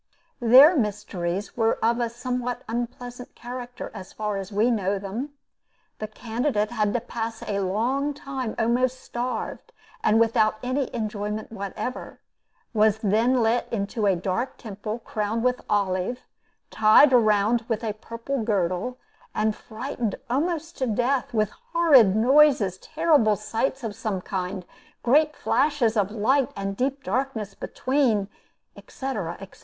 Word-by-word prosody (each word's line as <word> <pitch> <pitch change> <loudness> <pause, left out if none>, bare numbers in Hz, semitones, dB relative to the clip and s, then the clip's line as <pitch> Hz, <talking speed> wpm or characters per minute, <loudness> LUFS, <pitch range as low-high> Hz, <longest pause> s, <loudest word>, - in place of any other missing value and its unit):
Their 260 +8 +8
mysteries 200 - -2
were 225 -1 +2
of 235 +1 +2
a 235 -1 0
somewhat 245 +1 -3
unpleasant 245 +1 -5
character, 245 0 -7
as 190 -3 -9
far 210 -2 -2
as 195 +1 -6
we 215 +4 +2
know 200 -3 0
them. 220 +9 -5 0.7
The 215 - -3
candidate 225 0 -1
had 210 -3 +1
to - - +3
pass 225 -1 -5
a 200 -1 -2
long 245 +10 0
time 265 -5 -5
almost 250 +3 +1
starved, 245 +1 -4 0.3
and 220 - +4
without 220 -1 +3
any 255 +1 -1
enjoyment 215 -1 -4
whatever; 215 +4 -5 0.5
was 215 -1 +4
then 230 +5 +3
let 230 +2 +1
into 210 0 -1
a 195 - +4
dark 190 +8 -2
temple, 215 0 -5
crowned 220 -1 -3
with 250 0 +1
olive, 200 +4 0 0.5
tied 220 +6 +6
round 220 -1 +3
with 225 -1 -2
a 215 -2 -1
purple 230 +5 -5
girdle, 200 +3 -1 0.4
and 215 0 +1
frightened 230 -1 -4 0.2
almost 325 +4 -1
to 260 - 0
death 245 +4 0
with 215 -2 +1 0.2
horrid 275 - +6
noises, 245 -5 +4
terrible 300 - +3
sights 225 +6 -2
of 220 -2 -3
some 215 -4 -2
kind, 185 0 -4 0.4
great 300 +5 +3
flashes 280 -7 +1
of 205 -3 +2
light 235 +6 +2
and 195 0 -3
deep 275 +4 -1
darkness 220 -2 -2
between, 240 -5 0 0.5
etc., 210 -11 -5
etc. 195 -1 -12
225 Hz, 140 wpm, -25 LUFS, 210-255 Hz, 0.7 s, Their